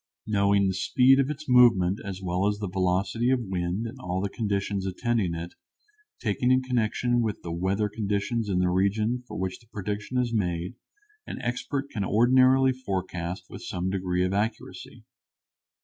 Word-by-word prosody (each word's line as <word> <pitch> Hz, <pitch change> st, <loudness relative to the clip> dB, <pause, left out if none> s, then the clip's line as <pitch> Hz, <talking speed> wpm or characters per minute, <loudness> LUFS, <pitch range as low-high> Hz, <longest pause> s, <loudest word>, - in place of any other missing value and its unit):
Knowing 100 Hz, -2 st, +2 dB
the 95 Hz, -, 0 dB
speed 125 Hz, +9 st, +4 dB
of 135 Hz, 0 st, +2 dB
its 150 Hz, +1 st, -6 dB
movement 115 Hz, -7 st, +5 dB
as 95 Hz, -1 st, -6 dB
well 90 Hz, +2 st, 0 dB
as 105 Hz, 0 st, 0 dB
the 105 Hz, -1 st, -4 dB
velocity 95 Hz, +6 st, 0 dB
of 130 Hz, -1 st, +3 dB
wind 95 Hz, -1 st, -2 dB
and 115 Hz, -, -7 dB
all 90 Hz, +1 st, -3 dB
the 100 Hz, 0 st, -2 dB
conditions 100 Hz, -3 st, -2 dB
attending 95 Hz, -2 st, -1 dB
it, 85 Hz, +1 st, -6 dB, 0.7 s
taken 120 Hz, +2 st, 0 dB
in 130 Hz, 0 st, +3 dB
connection 120 Hz, 0 st, +1 dB
with 110 Hz, -3 st, -3 dB
the 85 Hz, -, -5 dB
weather 95 Hz, +5 st, 0 dB
conditions 105 Hz, +1 st, -2 dB
in 95 Hz, -, 0 dB
the 90 Hz, 0 st, +2 dB
region 105 Hz, +6 st, +1 dB
for -, -, -7 dB
which 95 Hz, 0 st, -3 dB
the 115 Hz, -, -23 dB
prediction 105 Hz, +3 st, -4 dB
is 125 Hz, -2 st, 0 dB
made, 90 Hz, -4 st, -1 dB, 0.5 s
an -, -, -6 dB
expert 130 Hz, +3 st, -2 dB
can 100 Hz, -, -2 dB
ordinarily 130 Hz, +5 st, +4 dB
forecast 95 Hz, -7 st, -4 dB
with -, -, -10 dB
some 90 Hz, +1 st, -3 dB
degree 90 Hz, -1 st, 0 dB
of 90 Hz, -, -1 dB
accuracy. 105 Hz, +3 st, -4 dB
100 Hz, 170 wpm, -26 LUFS, 95-120 Hz, 0.7 s, movement